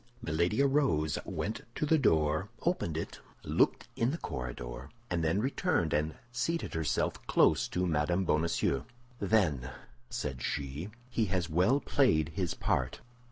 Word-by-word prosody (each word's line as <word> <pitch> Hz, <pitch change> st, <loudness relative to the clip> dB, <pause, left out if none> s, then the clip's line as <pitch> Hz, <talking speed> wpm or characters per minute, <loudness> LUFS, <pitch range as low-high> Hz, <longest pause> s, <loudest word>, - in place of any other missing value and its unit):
Milady 85 Hz, -, +1 dB
arose, 110 Hz, -, +2 dB
went 110 Hz, -, -3 dB
to -, -, 0 dB
the 160 Hz, +1 st, +4 dB
door, 80 Hz, -, +2 dB
opened 165 Hz, -, 0 dB
it, 80 Hz, -, -5 dB, 0.2 s
looked -, -, +2 dB
in 115 Hz, -, +2 dB
the 155 Hz, -, -2 dB
corridor, 60 Hz, -, -5 dB, 0.2 s
and 85 Hz, -2 st, +1 dB
then 80 Hz, +5 st, +2 dB
returned 130 Hz, -, +1 dB
and 75 Hz, +1 st, 0 dB, 0.2 s
seated 165 Hz, +8 st, -1 dB
herself 80 Hz, -1 st, -1 dB
close -, -, +4 dB
to 90 Hz, +1 st, -1 dB
Mme. 85 Hz, +3 st, +1 dB
Bonacieux. 85 Hz, -1 st, +1 dB, 0.4 s
"Then," 90 Hz, -, +2 dB, 0.4 s
said 75 Hz, -, -4 dB
she, 70 Hz, +9 st, -3 dB, 0.2 s
"he 120 Hz, -3 st, 0 dB
has 90 Hz, -3 st, -1 dB
well 95 Hz, -, +4 dB
played 80 Hz, -, +2 dB
his 90 Hz, 0 st, -2 dB
part." -, -, -1 dB
85 Hz, 140 wpm, -31 LUFS, 75-115 Hz, 0.4 s, the